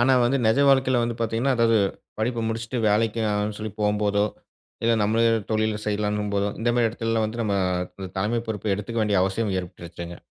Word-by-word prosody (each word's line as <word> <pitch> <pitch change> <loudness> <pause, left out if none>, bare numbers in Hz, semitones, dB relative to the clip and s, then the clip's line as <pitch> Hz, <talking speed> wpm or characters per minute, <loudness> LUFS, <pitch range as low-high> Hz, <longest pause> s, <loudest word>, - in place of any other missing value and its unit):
ஆனா 125 +2 +4
வந்து 125 +3 +2
நெஜ 110 +4 +3
வாழ்க்கையில 130 -2 +4
வந்து 120 0 -2
பார்த்தீங்கன்னா, 115 +4 +1
அதாவது 115 -1 +4 0.4
படிப்ப 115 +1 -1
முடிச்சுட்டு 115 +2 -3
வேலைக்காகன்னு 105 -1 0
சொல்லி 110 -1 -5
போகம்போதோ, 105 0 +2 0.6
இல்ல 115 0 +4
நம்மள 110 +2 +2 0.3
தொழில்ல 110 -1 +1
செய்யலான்னும் 105 0 -1
போதோ, 100 0 +1
இந்த 120 +1 +2
மாரி 120 -1 +3
எடத்லலாம் 115 -1 -1
வந்து 115 +2 -4
நம்ம 105 -2 0 0.6
தலைமை 110 +4 0
பொறுப்ப 105 -1 -1
எடுத்துக்கவேண்டிய 105 +4 -6 0.2
வேண்டிய - - +4
அவசியம் 95 +1 -1
ஏற்பட்டுருச்சுங்க. 85 -1 -8
110 Hz, 165 wpm, -24 LUFS, 105-115 Hz, 0.6 s, ஆனா